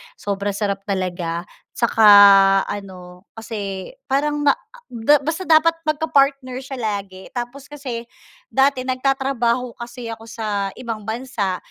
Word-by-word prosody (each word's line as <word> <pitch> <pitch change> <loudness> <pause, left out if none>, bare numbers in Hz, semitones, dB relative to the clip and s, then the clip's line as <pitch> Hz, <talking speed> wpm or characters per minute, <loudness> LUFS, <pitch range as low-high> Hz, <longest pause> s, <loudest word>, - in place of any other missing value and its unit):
sobrang 200 0 -3
sarap 200 -1 -2
talaga, 175 -3 -2 0.3
saka 225 -2 +3 0.6
ano, 185 -2 -8
kasi, 205 -4 -6 0.2
parang 295 +2 0
ma 280 - +6
a - - -29 0.3
da 240 +5 +4
basta 320 +5 -3
dapat 320 +1 +5
magka-partner 275 -4 +1
siya 270 0 -7
lagi 200 -4 -4
tapos 250 +3 -6
kasi, 255 -5 -6 0.5
dati 270 -1 +2
nagtatrabaho 255 -2 0
kasi 240 0 -8
ako 225 0 -12
sa 205 -3 -2
ibang 230 -3 -5
bansa, 220 -5 -2
235 Hz, 125 wpm, -21 LUFS, 200-270 Hz, 0.6 s, ma